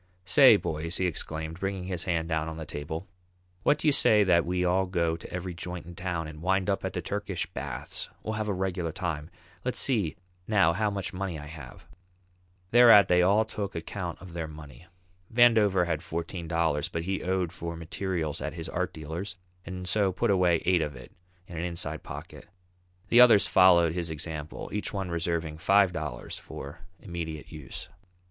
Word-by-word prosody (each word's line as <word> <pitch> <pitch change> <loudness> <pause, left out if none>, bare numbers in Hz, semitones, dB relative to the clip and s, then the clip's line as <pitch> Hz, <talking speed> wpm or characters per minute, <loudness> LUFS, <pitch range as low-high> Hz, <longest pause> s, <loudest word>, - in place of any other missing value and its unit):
"Say, 130 +5 +8
boys," 85 -1 -2
he 95 - 0
exclaimed, 80 -1 -3
bringing 95 -1 -2
his 90 -2 -3
hand 80 -2 0
down 80 -1 -1
on 80 - -7
the 80 - -6
table, 80 +5 -5 0.5
"what 145 +8 +3
do 155 - -1
you - - +7
say 105 -6 +5
that 85 -3 +3
we 90 0 0
all 95 +2 +2
go 85 -3 0
to 85 - -10
every 90 0 -4
joint 90 0 -6
in 85 - -9
town, 85 -2 -3
and 75 0 -10
wind 95 +2 +1
up 100 - -2
at - - -3
the - - -3
Turkish - - -2
baths? - - -6
We'll 110 - -3
have 110 0 -2
a - - 0
regular 90 -3 -2
time. 80 -3 -4 0.3
Let's 125 - -2
see 105 - +1 0.3
now 95 -6 +4
how 105 +4 +1
much 100 -1 -4
money 90 -3 -3
I 75 - -8
have." 75 -5 -11 0.9
Thereat 115 -4 +8
they 90 0 +5
all 100 +5 +4
took 105 -2 -5
account 85 +1 -5
of 90 -2 -11
their 85 -2 -3
money. 75 -1 -12 0.4
Vandover 110 -6 +5
had 80 -2 -1
fourteen 85 +1 -5
dollars, 80 -3 0
but 85 - -3
he 95 +2 -2
owed 90 -2 0
for 85 0 -5
materials 85 -1 -3
at - - -3
his - - -6
art - - -2
dealer's, 80 +5 -5 0.3
and 90 -1 -6
so 100 +1 +2
put 95 - +1
away 90 -3 +3
eight 90 -2 +4
of 75 -3 -3
it - - -12 0.3
in 85 -2 -7
an - - -2
inside 85 -1 -4
pocket. - - -9 0.6
The 120 - +7
others 115 -5 +7
followed 85 -3 +5
his 85 -1 -3
example, 80 0 -5
each 105 - -2
one 95 -4 -3
reserving 85 -2 -2
five 95 +1 +4
dollars 75 -7 -5
for 70 +5 -9 0.2
immediate 85 -6 -6
use. 75 -4 -8
90 Hz, 190 wpm, -28 LUFS, 80-95 Hz, 0.9 s, Say